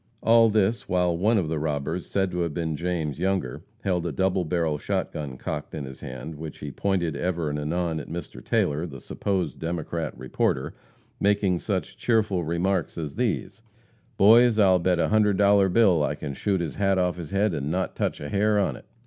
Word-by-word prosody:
All 115 0 +6
this 105 +1 +1
while 90 -2 +2
one 105 +7 +2
of 90 -6 0
the 80 -1 -2
robbers, 75 +3 -2
said 95 -2 0
to 90 - -3
have 85 -4 -1
been 80 -2 -1
James 80 -3 -2
Younger, 95 -8 -1 0.2
held 90 -3 0
a - - -2
double 95 +4 +1
barrel 80 -3 -1
shot - - -2
gun 70 -5 -6
cocked - - -5
in 75 -3 -4
his 65 0 -9
hand, 65 +5 -7
which 80 -1 -7
he 75 - -6
pointed 90 -1 -1
ever 85 -4 -1
and 75 - -3
anon 80 +2 -1
at 75 - -9
Mr. 85 +2 -7
Taylor, 75 +4 0
the 70 -4 -9
supposed 90 0 -2
Democrat 80 -2 -3
reporter, - - -1 0.5
making 100 -3 +2
such 95 -1 -3
cheerful 105 -6 +1
remarks 85 +2 -1
as 75 -4 -4
these: 110 -2 -2 0.6
"Boys, 115 +3 +6
I'll 95 -4 +5
bet 90 +1 +2
a - - +1
hundred 105 -2 +3
dollar 100 -1 +5
bill 95 -5 +4
I 75 - 0
can 75 -1 -5
shoot 95 +6 0
his 80 -5 -4
hat 95 -1 +2
off 90 -1 +1
his 85 -4 -7
head 100 +1 +1
and 70 -2 -2
not 90 +3 -2
touch - - -1
a 75 - -6
hair 105 +3 +2
on 100 - +1
it." - - -13
90 Hz, 200 wpm, -25 LUFS, 80-100 Hz, 0.6 s, All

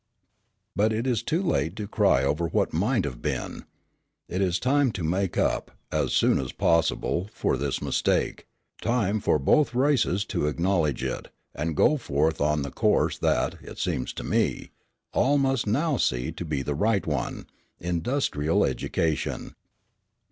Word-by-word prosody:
But 105 +4 +3
it 115 +3 -1
is 120 -5 +1
too 165 +10 -1
late 80 - 0
to 105 -2 -5
cry 100 - +3
over 75 +5 0
what - - 0
might 105 - +1
have 65 -4 -5
been. - - -3 0.6
It 90 - -2
is 90 -2 +2
time 135 +2 +2
to 90 - -4
make 90 +3 -1
up, - - +1 0.2
as - - 0
soon - - +3
as 65 - -3
possible, 85 +3 +1
for - - 0
this 70 -1 -2
mistake, - - 0 0.3
time 110 -3 +1
for 85 - +2
both 125 - +2
races 125 -7 +2
to 75 - +1
acknowledge 85 -2 0
it, - - -3 0.3
and 80 +2 -2
go 150 - +4
forth 80 - 0
on 75 0 +2
the 70 - -5
course - - +1
that, - - 0
it - - -10
seems 65 - -2
to - - -6
me, - - 0 0.4
all 140 +3 +3
must 135 -4 +1
now 140 +7 +1
see 60 - 0
to 90 - -6
be 75 -4 -2
the 75 - -2
right 100 +6 +1
one, 75 -5 -3 0.3
industrial 85 - 0
education. 80 -2 -2
90 Hz, 160 wpm, -26 LUFS, 75-120 Hz, 0.6 s, go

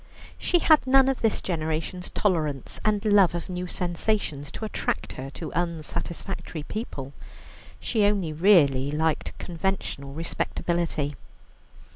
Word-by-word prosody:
She 355 - +3
had 310 -5 +5
none 265 0 +6
of 270 - -1
this 225 -2 +1
generation's 165 +1 -2
tolerance 155 - -1
and 210 0 +1
love 200 -4 +5
of 170 +2 -4
new 180 0 -3
sensations 175 -5 -1
to 220 - -4
attract 215 - -2
her 130 +1 -6
to 165 - -5
unsatisfactory 170 0 -3
people. 145 - -5 0.7
She 220 -3 +1
only 195 -6 +1
really 150 -7 +5
liked 155 0 0
conventional 175 -6 -3
respectability. 165 -1 -1
175 Hz, 120 wpm, -26 LUFS, 155-205 Hz, 0.7 s, none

